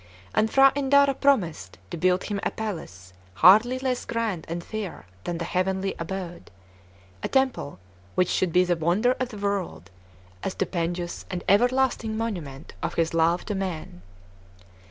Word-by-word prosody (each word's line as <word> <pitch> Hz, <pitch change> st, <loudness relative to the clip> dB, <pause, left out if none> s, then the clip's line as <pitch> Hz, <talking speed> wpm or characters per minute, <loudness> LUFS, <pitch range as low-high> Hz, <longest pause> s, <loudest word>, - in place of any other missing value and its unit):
And 220 Hz, -, +2 dB
P'hra 270 Hz, +2 st, +6 dB
Indara 280 Hz, 0 st, +4 dB
promised 190 Hz, -, +1 dB
to -, -, -3 dB
build 180 Hz, +2 st, +2 dB
him 205 Hz, -2 st, -3 dB
a -, -, 0 dB
palace 100 Hz, -, -6 dB, 0.2 s
hardly 215 Hz, -, +6 dB
less 255 Hz, -1 st, -1 dB
grand 225 Hz, -8 st, -2 dB
and 170 Hz, +1 st, -4 dB
fair 215 Hz, -, -6 dB, 0.2 s
than 175 Hz, -, -2 dB
the 170 Hz, -, -3 dB
heavenly 190 Hz, +2 st, -1 dB
abode, 175 Hz, 0 st, -6 dB, 0.7 s
a -, -, -1 dB
temple 265 Hz, -, 0 dB, 0.4 s
which 180 Hz, -, +3 dB
should 185 Hz, -2 st, +1 dB
be 180 Hz, +2 st, +5 dB
the 175 Hz, -1 st, +1 dB
wonder 175 Hz, +9 st, +2 dB
of 255 Hz, -1 st, -1 dB
the 215 Hz, -, -9 dB
world, 200 Hz, -, -3 dB, 0.5 s
a -, -, 0 dB
stupendous 175 Hz, -1 st, -3 dB
and 180 Hz, -1 st, -4 dB
everlasting 240 Hz, +1 st, +2 dB
monument 170 Hz, -11 st, -5 dB
of -, -, -3 dB
his 165 Hz, 0 st, +1 dB
love 165 Hz, +2 st, +2 dB
to 210 Hz, -, -2 dB
men. 180 Hz, -, -4 dB
190 Hz, 155 wpm, -25 LUFS, 170-230 Hz, 0.7 s, P'hra